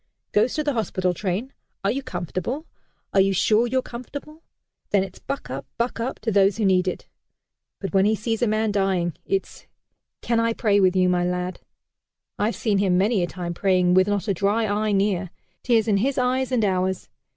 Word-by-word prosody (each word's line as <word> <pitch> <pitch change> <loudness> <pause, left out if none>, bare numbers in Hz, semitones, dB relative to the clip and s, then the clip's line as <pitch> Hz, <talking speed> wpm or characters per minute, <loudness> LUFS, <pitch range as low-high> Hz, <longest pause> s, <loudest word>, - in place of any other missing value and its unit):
Goes 220 +4 +2
to 305 - 0
the 290 -1 0
hospital 185 -6 0
train 205 +8 -3 0.3
'Are 195 - +2
you 275 - -2
comfortable? 185 - -4 0.5
Are 195 - +5
you 195 0 +3
sure 215 +5 +3
you're 260 +1 0
comfortable?' 285 +6 -9 0.5
Then 200 -2 +3
it's 190 -1 -9
'Buck 275 - -5
up! 135 0 -5
Buck 235 0 -1
up!' 235 +3 -2
to 225 +1 -1
those 200 0 +3
who 220 - 0
need 185 -1 +3
it. 185 - -3 0.7
But 195 -3 -5
when 195 0 +4
he 215 +1 +3
sees 225 +1 -2
a 240 - +3
man 215 0 +1
dying, 190 -4 0
it's 390 0 -3 0.6
'Can 235 -1 +1
I 230 0 +2
pray 210 -3 +2
with 185 -1 +3
you, 185 -1 +4
my 180 -1 +2
lad?' 180 +1 -2 0.8
I've 215 +3 +1
seen 210 -4 0
him 190 -2 +2
many 200 +2 +2
a 175 - 0
time 175 0 -5
praying, 180 -1 +2
with 185 +1 +5
not 205 +1 -1
a 200 - +2
dry 205 +5 +1
eye 210 +1 0
near 195 -2 +1 0.3
tears 230 -3 +2
in 205 -2 +3
his 265 +7 0
eyes 255 +1 +1
and 235 -4 +2
ours. 185 -1 0
205 Hz, 200 wpm, -24 LUFS, 185-230 Hz, 0.8 s, Are